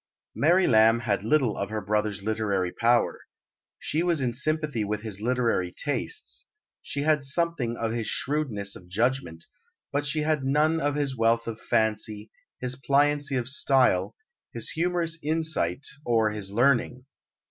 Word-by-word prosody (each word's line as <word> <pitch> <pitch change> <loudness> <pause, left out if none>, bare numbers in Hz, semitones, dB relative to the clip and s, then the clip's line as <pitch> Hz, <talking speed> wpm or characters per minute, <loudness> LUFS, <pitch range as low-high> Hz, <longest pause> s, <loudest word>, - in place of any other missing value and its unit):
Mary 175 +5 +3
Lamb 115 0 +5
had 100 -3 -1
little 125 -1 +2
of 100 - -3
her 110 0 -2
brother's 105 -1 -1
literary 100 -4 -1
power. 120 +4 +2 0.6
She 155 - -1
was 170 -3 +2
in 125 -3 0
sympathy 150 -2 -1
with 105 +1 -3
his 105 -3 -6
literary 115 -7 0
tastes, 430 - -4 0.3
she 140 - -3
had 150 -1 +2
something 140 -5 -1
of 115 -1 -2
his 115 -1 -2
shrewdness 125 -9 -1
of 90 - -13
judgment, 110 -5 -1 0.5
but 145 +1 0
she 155 +2 0
had 150 -2 0
none 150 +4 +2
of 145 0 0
his 140 -3 -1
wealth 115 0 +2
of 115 -1 -6
fancy, 110 -1 -1 0.3
his 125 0 -1
pliancy 145 +1 +1
of 125 -2 -1
style, 135 -1 +2 0.4
his - - -3
humorous 170 0 -1
insight, 155 - -1 0.2
or 115 -4 +2
his 105 -2 -4
learning. 125 +3 +1
125 Hz, 150 wpm, -26 LUFS, 110-145 Hz, 0.6 s, Lamb